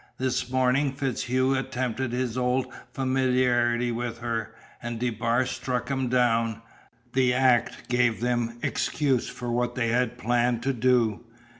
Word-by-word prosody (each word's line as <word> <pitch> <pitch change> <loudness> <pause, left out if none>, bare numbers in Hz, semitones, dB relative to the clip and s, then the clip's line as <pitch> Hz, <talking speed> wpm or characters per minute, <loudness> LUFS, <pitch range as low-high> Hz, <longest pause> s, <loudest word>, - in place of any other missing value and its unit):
"This 125 -1 -1
morning 130 +2 +2
FitzHugh 130 -1 0
attempted 130 -1 -2
his 125 -1 -2
old 125 +1 +1 0.3
familiarity 125 -2 +1
with 120 0 -3
her, 115 -2 -3 0.3
and 120 -1 -4
DeBar 120 +1 +1
struck 125 -1 -3
him 130 -2 0
down. 115 -2 +1 0.5
The 130 -1 +3
act 130 -2 +2
gave 125 -2 +2
them 120 -1 -1
excuse 135 -5 0
for 120 -1 -5
what 120 0 0
they 115 -3 0
had 125 0 0
planned 120 +1 +1
to 135 +1 +1
do. 120 -3 +2
125 Hz, 135 wpm, -26 LUFS, 120-130 Hz, 0.5 s, The